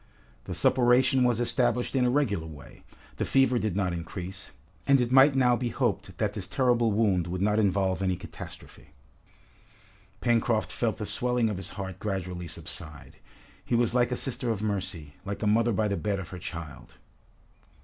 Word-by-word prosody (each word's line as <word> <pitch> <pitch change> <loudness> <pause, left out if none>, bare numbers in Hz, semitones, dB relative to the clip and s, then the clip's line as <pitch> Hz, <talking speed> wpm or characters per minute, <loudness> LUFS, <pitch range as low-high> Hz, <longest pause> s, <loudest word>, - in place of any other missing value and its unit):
The - - -5
suppuration 130 +1 +4
was 120 -2 +2
established 120 +1 +1
in 130 -2 +3
a - - +3
regular 110 - 0
way, 75 -3 -12 0.3
the - - -1
fever 130 -2 +3
did 110 -5 -2
not 95 -3 0
increase, 90 +3 -6 0.4
and 140 -1 +5
it 120 -1 0
might 135 +2 +6
now 125 -2 +4
be 120 0 -2
hoped - - -2
that - - 0
this - - -5
terrible 120 -3 +2
wound 100 -5 +2
would 90 +1 -3
not 105 +1 +2
involve 95 -2 +1
any 95 -1 +1
catastrophe. 75 - -11 1.3
Pencroft 115 -4 +1
felt 115 -3 -1
the 105 - -4
swelling 125 0 +1
of 100 - -4
his 95 0 -5
heart 95 -2 -6
gradually 90 -4 -4
subside. 80 -1 -8 0.5
He 120 - -1
was 120 -1 +2
like 120 0 +2
a - - +1
sister 125 -1 -2
of 110 -2 -1
mercy, 95 -8 -3
like 100 +2 -5
a - - +1
mother 115 +3 +3
by 105 +1 +1
the 100 -1 -1
bed 105 -2 -1
of 95 -4 -6
her 95 - -8
child. 80 -3 -8
105 Hz, 180 wpm, -28 LUFS, 95-120 Hz, 1.3 s, might